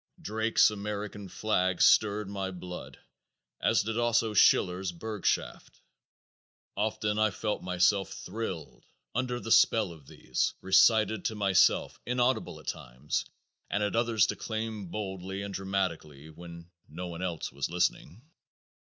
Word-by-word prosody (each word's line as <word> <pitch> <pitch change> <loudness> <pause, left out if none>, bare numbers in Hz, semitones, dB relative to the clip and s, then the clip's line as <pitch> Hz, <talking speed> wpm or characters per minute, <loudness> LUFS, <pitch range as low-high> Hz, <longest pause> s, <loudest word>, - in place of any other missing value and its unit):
Drake's 110 +1 +2
"American 105 -1 -5
Flag" 95 -4 0
stirred 105 -1 +4
my 100 -1 -3
blood 90 -1 -8 0.6
as - - +3
did 110 +2 -2
also 115 -2 +2
Schiller's 90 -2 +3
"Burgschaft." 105 +3 -3 1.0
Often 105 0 -1
I 110 0 +4
felt 105 +1 -3
myself 90 +2 +1
thrilled 95 -6 -6 0.3
under 125 0 -1
the 115 - -6
spell 110 -5 +4
of 75 -5 -14
these, - - -2
recited 110 +2 +4
to 110 - -1
myself, 100 -3 +3
inaudibly 125 +1 0
at - - -22
times, 65 +3 -3 0.4
and 105 +1 0
at 105 - -1
others 115 -3 +3
declaimed 110 -4 -4
boldly 95 0 -5
and 100 -1 -6
dramatically, 85 -7 -3
when 85 +1 -12 0.2
no 85 +4 -6
one 85 0 -7
else 85 -3 -3
was 70 -1 -3
listening. 90 - -1
100 Hz, 125 wpm, -29 LUFS, 90-110 Hz, 1.0 s, stirred